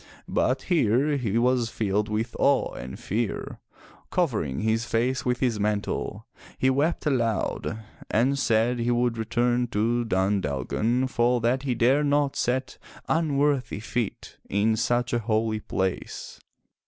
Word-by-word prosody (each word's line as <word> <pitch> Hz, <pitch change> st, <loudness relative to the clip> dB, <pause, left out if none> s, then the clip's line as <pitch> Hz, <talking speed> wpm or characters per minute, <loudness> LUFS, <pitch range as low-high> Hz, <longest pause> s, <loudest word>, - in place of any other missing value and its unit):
But 130 Hz, +1 st, 0 dB
here 145 Hz, -, +2 dB
he 115 Hz, -6 st, -1 dB
was 120 Hz, -1 st, +2 dB
filled 105 Hz, -1 st, -1 dB
with 110 Hz, +2 st, -2 dB
awe -, -, +2 dB
and 65 Hz, +1 st, -7 dB
fear. 110 Hz, +2 st, -3 dB, 0.5 s
Covering 110 Hz, -, 0 dB
his 110 Hz, +1 st, +1 dB
face 125 Hz, +2 st, 0 dB
with 125 Hz, -1 st, 0 dB
his 120 Hz, -5 st, +1 dB
mantle, 105 Hz, 0 st, -2 dB, 0.3 s
he 130 Hz, -, +3 dB
wept 150 Hz, +7 st, 0 dB
aloud 115 Hz, -5 st, 0 dB, 0.3 s
and 135 Hz, +5 st, +2 dB
said 115 Hz, +1 st, +2 dB
he 120 Hz, +1 st, 0 dB
would 120 Hz, -1 st, +1 dB
return 120 Hz, +2 st, +1 dB
to 115 Hz, +2 st, 0 dB
Dun 95 Hz, -2 st, +1 dB
Dalgan, 110 Hz, -, 0 dB
for 120 Hz, -1 st, +2 dB
that 120 Hz, +3 st, +1 dB
he 130 Hz, -3 st, -1 dB
dared 135 Hz, +6 st, +3 dB
not 145 Hz, -1 st, +2 dB
set 130 Hz, +1 st, -1 dB, 0.3 s
unworthy 145 Hz, -7 st, +1 dB
feet 115 Hz, 0 st, -4 dB
in 105 Hz, +3 st, +2 dB
such 120 Hz, +2 st, 0 dB
a 120 Hz, -, +2 dB
holy 110 Hz, -1 st, 0 dB
place. 95 Hz, -3 st, -3 dB
120 Hz, 140 wpm, -26 LUFS, 110-130 Hz, 0.5 s, he